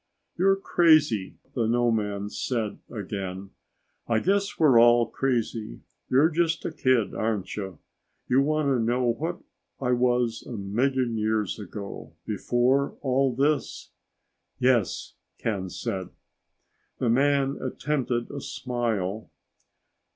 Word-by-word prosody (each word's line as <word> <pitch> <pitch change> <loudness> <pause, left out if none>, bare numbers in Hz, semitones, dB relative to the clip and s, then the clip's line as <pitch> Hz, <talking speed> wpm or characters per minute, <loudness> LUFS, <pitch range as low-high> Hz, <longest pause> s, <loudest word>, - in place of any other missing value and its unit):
"You're 195 +2 +4
crazy," 155 - +3 0.2
the 115 -3 0
nomad 110 -4 0
said 115 -5 -2
again. 95 -2 -5 0.6
"I 115 - +2
guess 200 - +1
we're 140 -7 +6
all 120 0 +6
crazy. 115 - -2 0.3
You're 145 +6 +4
just 165 0 0
a - - -1
kid, 125 -6 +1
aren't 105 -4 -2
you? 95 -5 -5 0.5
You 130 +2 +4
want 155 0 +1
to 130 -3 +2
know 125 +2 +1
what 165 +9 -4 0.4
I 125 -2 0
was 120 -2 +1
a - - -9
million 120 +4 0
years 110 -1 0
ago, 100 0 -8
before 120 +6 +1
all 130 -1 +1
this?" 145 +2 0 0.7
"Yes," 125 -6 +1 0.2
Ken 100 -5 -2
said. 90 +1 -4 0.9
The 125 - -1
man 140 +2 +2
attempted 130 -2 -2
a 140 - -5
smile. 110 -7 -3
120 Hz, 115 wpm, -26 LUFS, 105-135 Hz, 0.9 s, we're